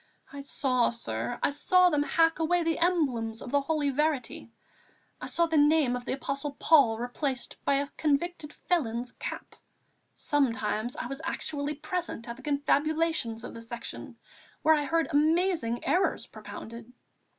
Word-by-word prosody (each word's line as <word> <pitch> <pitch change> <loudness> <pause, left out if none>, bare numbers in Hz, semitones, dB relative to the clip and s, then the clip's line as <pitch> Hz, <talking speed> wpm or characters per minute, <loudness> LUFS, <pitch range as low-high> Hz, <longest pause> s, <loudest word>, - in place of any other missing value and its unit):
I 280 - -6
saw, 260 -3 +1
sir, 115 - -4
I - - +3
saw 360 +5 +4
them 295 -1 +2
hack 325 +2 +2
away 345 +2 +2
the 325 -1 0
emblems 265 -11 +1
of 245 - -7
the 285 - +3
Holy 295 -1 0
Verity; 285 -5 -1 0.7
I - - -5
saw 340 - +2
the 325 -2 +2
name 295 -4 +4
of 245 0 -6
the - - -1
Apostle 275 +1 -4
Paul 275 -9 +5
replaced 250 +2 -3
by 280 - +3
a 280 +1 0
convicted 305 +1 -1
felon's 245 -10 -1
cap. - - -7 0.6
Sometimes 240 -5 0
I - - -4
was 275 +4 -5
actually 295 -2 -2
present 310 -5 -4
at 235 - -5
the 265 - -14
confabulations 295 -4 0
of - - -7
the 230 - -8
Section, 230 0 -7 0.5
where 315 +1 +6
I 295 -2 +1
heard 330 +2 +1
amazing 310 -5 +1
errors 375 +2 +1
propounded. 230 +1 -10
285 Hz, 155 wpm, -28 LUFS, 245-320 Hz, 0.7 s, where